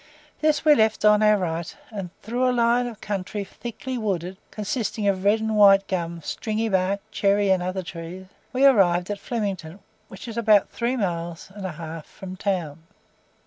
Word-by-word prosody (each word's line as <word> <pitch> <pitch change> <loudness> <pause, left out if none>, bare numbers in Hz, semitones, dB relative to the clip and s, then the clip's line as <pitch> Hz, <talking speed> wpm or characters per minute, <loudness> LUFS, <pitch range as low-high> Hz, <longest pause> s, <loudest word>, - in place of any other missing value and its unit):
This 310 0 +1
we 305 - +8
left 220 -4 +2
on 210 0 +6
our 215 0 +5
right, 170 -3 -3
and 195 -4 -5
through 245 +3 +1
a - - +3
line 240 0 +2
of 225 -3 -9
country 205 0 -3
thickly 240 +5 -6
wooded 190 -4 -2
(consisting 215 0 -2
of 190 -1 +1
red 205 +2 +4
and 220 0 -1
white 195 -1 +6
gum, 170 -2 -3
stringy 220 +7 -2
bark, 190 +1 +1
cherry 200 -1 +2
and 185 -1 +3
other 185 +1 -3
trees), 170 +2 -8 0.3
we 260 +2 +3
arrived 185 -8 +4
at 205 - -4
Flemington, 195 -7 -4 0.3
which 195 +4 -10
is 230 -1 -6
about 215 -3 +4
three 245 +2 -1
miles 170 -4 -3
and 200 -2 -5
a 180 - -6
half 160 0 -8
from 185 -1 -9
town. 180 -6 -2
200 Hz, 180 wpm, -24 LUFS, 180-220 Hz, 0.3 s, we